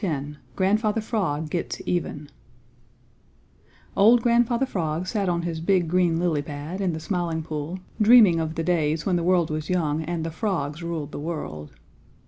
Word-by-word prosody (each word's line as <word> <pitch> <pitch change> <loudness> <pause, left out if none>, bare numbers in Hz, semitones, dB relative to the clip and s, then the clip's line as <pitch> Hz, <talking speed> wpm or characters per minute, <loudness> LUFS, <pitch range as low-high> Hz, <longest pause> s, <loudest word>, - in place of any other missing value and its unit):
X 150 -7 -1 0.3
GRANDFATHER 210 +3 +1
FROG 160 -9 -2
GETS 175 - -3
EVEN 150 -4 -2 1.7
Old 230 +4 +5
Grandfather 240 +1 +3
Frog 170 -7 -2
sat 200 -1 -1
on 170 -1 0
his 165 -2 -3
big 180 0 +2
green 175 -1 +2
lily 170 -4 +1
pad 150 +5 -6
in 185 -3 0
the 160 - -4
Smiling 170 -2 -2
Pool 155 +3 -4 0.2
dreaming 210 -6 +7
of 160 0 -3
the 165 - -2
days 160 -2 0
when 185 - +1
the 175 - +1
world 175 -3 +2
was 155 0 -4
young 160 -4 0
and 165 0 -3
the 165 - -3
frogs 165 -5 -2
ruled 165 -4 -4
the - - -6
world. 75 - -5
170 Hz, 165 wpm, -24 LUFS, 155-190 Hz, 1.7 s, dreaming